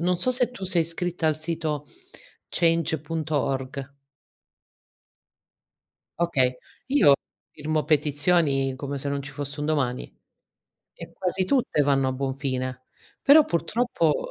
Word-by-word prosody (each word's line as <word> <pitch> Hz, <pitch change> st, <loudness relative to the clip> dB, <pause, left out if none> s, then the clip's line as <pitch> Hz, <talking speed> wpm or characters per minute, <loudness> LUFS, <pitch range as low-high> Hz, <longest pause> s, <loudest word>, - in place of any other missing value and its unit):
non 180 Hz, +1 st, +1 dB
so 255 Hz, -, +1 dB
se 250 Hz, -1 st, +1 dB
tu 195 Hz, -6 st, -8 dB
sei 180 Hz, -2 st, +2 dB
iscritta 170 Hz, 0 st, -3 dB
al 155 Hz, -, +3 dB
sito, 155 Hz, -2 st, -3 dB, 0.6 s
change.org. 150 Hz, -5 st, -1 dB, 2.2 s
Okay, 130 Hz, -7 st, +2 dB, 0.3 s
io 260 Hz, -, +6 dB, 0.4 s
firmo 155 Hz, 0 st, -1 dB
petizioni, 145 Hz, -2 st, +2 dB
come 140 Hz, +1 st, -4 dB
se 140 Hz, -, -3 dB
non 140 Hz, 0 st, -2 dB
ci 140 Hz, 0 st, -8 dB
fosse 145 Hz, +1 st, -5 dB
un 150 Hz, -, -2 dB
domani, 135 Hz, -5 st, 0 dB, 0.9 s
e -, -, -11 dB
quasi 185 Hz, 0 st, -1 dB
tutte 250 Hz, -, +1 dB
vanno 135 Hz, -2 st, +2 dB
a -, -, -1 dB
buon 135 Hz, 0 st, -2 dB
fine. 130 Hz, -2 st, -3 dB, 0.4 s
Però 300 Hz, +2 st, +7 dB
purtroppo 170 Hz, -, 0 dB
150 Hz, 120 wpm, -25 LUFS, 140-170 Hz, 2.2 s, Però